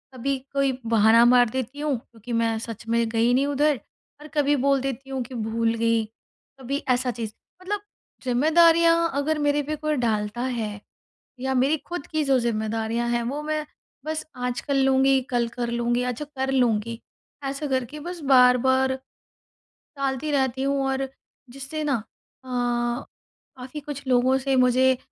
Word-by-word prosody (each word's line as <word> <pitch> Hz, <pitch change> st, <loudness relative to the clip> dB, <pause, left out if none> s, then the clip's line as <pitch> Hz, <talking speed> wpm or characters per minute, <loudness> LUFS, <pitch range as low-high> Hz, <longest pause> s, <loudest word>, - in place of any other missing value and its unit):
कभी 275 Hz, +2 st, -1 dB, 0.2 s
कोई 275 Hz, -1 st, +2 dB
बहाना 225 Hz, +1 st, +5 dB
मार 245 Hz, -1 st, +5 dB
देती 260 Hz, +3 st, -4 dB
हूँ 295 Hz, -3 st, 0 dB
क्योंकि 235 Hz, +1 st, -10 dB
मैं 230 Hz, -1 st, +1 dB
सच 230 Hz, -1 st, -8 dB
में 230 Hz, 0 st, +2 dB
गई 230 Hz, +2 st, +2 dB
नहीं 270 Hz, +3 st, +2 dB
उधर, 290 Hz, -1 st, +2 dB, 0.4 s
और 300 Hz, -, -10 dB
कभी 290 Hz, 0 st, +3 dB
बोल 275 Hz, -2 st, +3 dB
देती 270 Hz, 0 st, -4 dB
हूँ 265 Hz, -1 st, -2 dB
कि 250 Hz, +1 st, -10 dB
भूल 225 Hz, +1 st, 0 dB
गई। 230 Hz, 0 st, +2 dB, 0.6 s
कभी 265 Hz, +2 st, -2 dB
ऐसा 250 Hz, 0 st, +2 dB
चीज़, 225 Hz, -2 st, -5 dB, 0.3 s
मतलब 405 Hz, +2 st, -3 dB, 0.4 s
ज़िम्मेदारियाँ 330 Hz, +5 st, +4 dB
अगर 295 Hz, +3 st, 0 dB
मेरे 290 Hz, 0 st, +1 dB
पे 305 Hz, +2 st, -3 dB
कोई 305 Hz, 0 st, -1 dB
डालता 210 Hz, +1 st, -1 dB
है 230 Hz, -5 st, -3 dB, 0.6 s
या 265 Hz, +1 st, -1 dB
मेरी 270 Hz, +5 st, +3 dB
खुद 350 Hz, -4 st, -5 dB
की 310 Hz, -1 st, -1 dB
जो 270 Hz, -2 st, +3 dB
ज़िम्मेदारियाँ 225 Hz, 0 st, -1 dB
हैं, 240 Hz, 0 st, 0 dB
वो 275 Hz, +5 st, -3 dB
मैं 305 Hz, 0 st, -2 dB, 0.4 s
बस 310 Hz, 0 st, -3 dB
“आज 250 Hz, -1 st, -3 dB
कर 280 Hz, -, -2 dB
लूँगी, 270 Hz, 0 st, +4 dB
कल 240 Hz, -2 st, +1 dB
कर 240 Hz, 0 st, -4 dB
लूँगी, 240 Hz, +1 st, 0 dB
अच्छा 250 Hz, +4 st, -3 dB
कर 265 Hz, 0 st, -1 dB
लूँगी” 230 Hz, -3 st, +1 dB, 0.4 s
ऐसा 275 Hz, +2 st, -3 dB
करके 260 Hz, +2 st, -2 dB
बस 350 Hz, +3 st, -6 dB
बार-बार 260 Hz, +1 st, +5 dB, 1.0 s
टालती 275 Hz, +2 st, -2 dB
रहती 265 Hz, -2 st, 0 dB
हूँ, 275 Hz, 0 st, +1 dB
और 270 Hz, 0 st, -1 dB, 0.4 s
जिससे 275 Hz, +4 st, -6 dB
ना 285 Hz, -3 st, +1 dB, 0.5 s
अ, -, -, -13 dB, 1.1 s
काफ़ी 255 Hz, +4 st, -7 dB
कुछ 285 Hz, -1 st, -7 dB
लोगों 255 Hz, +1 st, +3 dB
से 270 Hz, 0 st, 0 dB
मुझे 255 Hz, 0 st, +4 dB
260 Hz, 160 wpm, -24 LUFS, 235-280 Hz, 1.1 s, बहाना